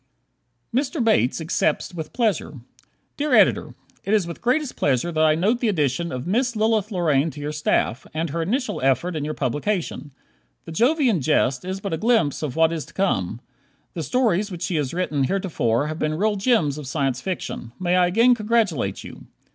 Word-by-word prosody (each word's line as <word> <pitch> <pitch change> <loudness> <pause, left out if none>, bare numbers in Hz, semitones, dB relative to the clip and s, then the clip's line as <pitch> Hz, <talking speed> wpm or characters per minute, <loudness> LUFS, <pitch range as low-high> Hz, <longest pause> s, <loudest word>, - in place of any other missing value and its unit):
Mr. 270 +2 0
Bates 215 - +2
Accepts 160 0 -1
with 160 -3 -6
Pleasure 210 - -1 0.6
Dear 295 -3 +2
Editor: 210 -4 +3 0.3
It 205 +3 +2
is 205 -5 +2
with 170 -1 -8
greatest 260 +3 0
pleasure 140 +5 0
I 155 0 +4
note 210 +9 +1
the 240 - 0
addition 165 -3 0
of 125 +1 -5
Miss 235 +6 0
Lilith 215 -1 +1
Lorraine 165 -5 +2
to 145 - -10
your 145 +1 -3
staff, 150 -4 0
and 160 -1 -3
her 165 +2 -2
initial 245 +10 -1
effort 135 +7 +1
in 150 - -2
your 155 +1 -3
publication. 150 - -2 0.6
"The - - -8
Jovian 240 - +2
Jest" 125 0 +1
is 190 +1 -4
but 200 -3 -3
a - - 0
glimpse 220 - +1
of 150 -4 -3
what 160 0 +3
is 160 -3 -3
to - - -18
come. 180 - -1 0.5
The 170 - -4
stories 215 - +1
which 175 -2 -6
she 170 0 -2
has 140 -3 -1
written 155 -6 0
heretofore 145 - 0
have 155 +2 -4
been 155 0 0
real 210 +5 +1
gems 195 - +1
of 145 - -8
Science 135 -2 -1
Fiction. 180 -10 -5
May 180 -1 +1
I 180 -1 +4
again 230 +7 +4
congratulate 210 - 0
you. - - -11
170 Hz, 185 wpm, -23 LUFS, 150-215 Hz, 0.6 s, I